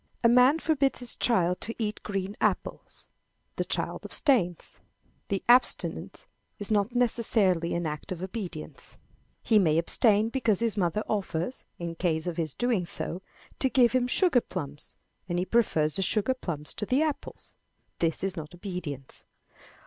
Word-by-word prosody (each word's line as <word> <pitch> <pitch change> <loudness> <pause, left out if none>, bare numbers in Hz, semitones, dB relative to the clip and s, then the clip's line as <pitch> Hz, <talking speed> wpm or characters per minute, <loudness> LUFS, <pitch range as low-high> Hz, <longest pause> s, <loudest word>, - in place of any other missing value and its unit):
A - - +7
man 250 +5 +6
forbids 290 -4 +1
his 245 -1 -2
child 180 -6 +1
to 230 - -2
eat 215 -2 -3
green 195 -1 -3
apples. - - -2 0.5
The - - +1
child - - -2
abstains. 195 - +1 0.5
That 195 -1 -2
abstinence 245 +2 +2 0.3
is 205 +1 -5
not 210 +3 +1
necessarily 215 -8 +2
an 170 0 -1
act 150 +2 -5
of 180 -1 -4
obedience. 185 -6 -7 0.5
He 220 -2 +4
may 160 -5 +3
abstain 210 +5 +3
because 230 -6 +1
his 230 -2 0
mother 195 +1 0
offers, 200 +1 -2
in 170 -1 -4
case 165 -2 -1
of 175 -2 -3
his 160 -4 -2
doing 235 -8 0
so, 170 +2 -4 0.4
to 265 - +2
give 245 -3 +4
him 250 0 +2
sugar 295 -2 +4
plums, 150 -8 -5 0.3
and 175 - -1
he 180 - 0
prefers 165 -8 +2
the 195 - 0
sugar 215 +6 +2
plums 155 - -5
to 210 - -2
the 270 +5 +3
apples. 305 -3 -5 0.5
This 165 0 0
is 195 -1 -1
not 160 0 -7
obedience. 175 -8 -7
195 Hz, 155 wpm, -28 LUFS, 170-235 Hz, 0.5 s, A